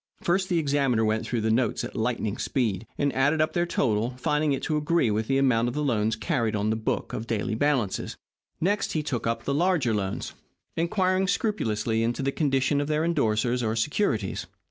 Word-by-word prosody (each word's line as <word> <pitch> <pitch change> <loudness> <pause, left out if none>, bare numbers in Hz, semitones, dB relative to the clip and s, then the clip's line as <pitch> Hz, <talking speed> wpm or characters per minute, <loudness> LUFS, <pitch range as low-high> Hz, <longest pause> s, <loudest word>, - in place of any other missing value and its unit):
First, 185 +2 +1
the 175 - +2
examiner 140 -7 +2
went 110 +1 0
through 120 -2 -1
the 110 0 +1
notes 120 +3 +1
at - - -6
lightning 110 -2 -1
speed, 110 -5 -1
and 140 -1 +1
added 140 +4 +2
up 155 - +1
their 175 0 +1
total, 115 -5 0
finding 150 +3 +1
it 135 - -1
to 155 - 0
agree 150 -5 +2
with 110 +1 -1
the 135 - +2
amount 125 -4 +3
of 120 - -3
loans 115 -7 +1
carried 110 0 -1
on 105 +1 0
the - - +1
book 110 - -2
of 115 - -4
daily 110 -2 -1
balances. 120 -5 0 0.4
Next, 200 +5 0
he 155 - 0
took 125 -6 -2
up 115 - -1
the 140 - -1
larger 155 -6 +2
loans, 100 -2 -3 0.4
inquiring 185 +2 +1
scrupulously 115 - 0
into 120 +4 -1
the 135 - +1
condition 140 -1 +1
of 145 - -2
their 155 0 +1
endorsers 125 -6 +1
or 110 -1 0
securities. 115 - -1
130 Hz, 195 wpm, -26 LUFS, 110-150 Hz, 0.4 s, amount